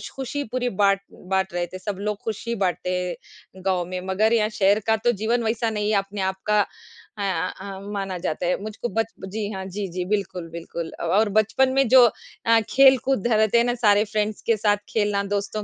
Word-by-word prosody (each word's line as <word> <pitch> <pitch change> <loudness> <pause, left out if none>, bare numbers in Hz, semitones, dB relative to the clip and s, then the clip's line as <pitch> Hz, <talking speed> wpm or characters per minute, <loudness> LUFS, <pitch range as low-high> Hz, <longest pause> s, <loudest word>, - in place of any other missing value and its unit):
ख़ुशी 270 +2 -3
पूरी 250 0 0
बाँट 195 -1 +2
बाँट 190 0 -2
रहे 175 0 -1
थे, 185 +2 -9
सब 195 +1 -4
लोग 210 0 -2
ख़ुशी 230 +2 -3
बाँटते 185 -3 -1
हैं, 180 +1 -7
गाँव 185 -2 +1
में 185 0 -4
मगर 215 +4 +2
यहाँ 215 -2 +3
शहर 200 -1 +3
का 220 - +4
तो 240 - +5
जीवन 235 +2 +1
वैसा 225 +1 0
नहीं 210 -1 -1
है, 210 - +3
अपने 195 +1 -3
आप 190 0 0
का 210 0 +4
अ 205 +1 -9 0.4
अ, 195 -1 -7
माना 195 -2 -3
जाता 175 -1 -3
है। 180 +2 0
मुझको 215 +3 -4
बच 225 0 -2
जी 205 +1 -3
हाँ, 190 0 -5
जी, 195 +1 -4
जी 180 +1 -3
बिल्कुल, 185 -4 -2
बिल्कुल 170 0 -6
अ, - - -5
और 205 +6 +3
बचपन 260 +5 +2
में 270 -2 +3
जो 255 0 +8 0.4
अ, 230 0 +5
खेल-कूद 265 -3 +4
रहते 220 -1 +3
हैं 235 - +4
ना, 245 0 0
सारे 210 -3 +4
फ्रेंड्स 215 0 -2
के 230 - +3
साथ 205 0 +2
खेलना, 205 -2 +1
दोस्तों 205 +1 -3
205 Hz, 205 wpm, -24 LUFS, 190-225 Hz, 0.4 s, जो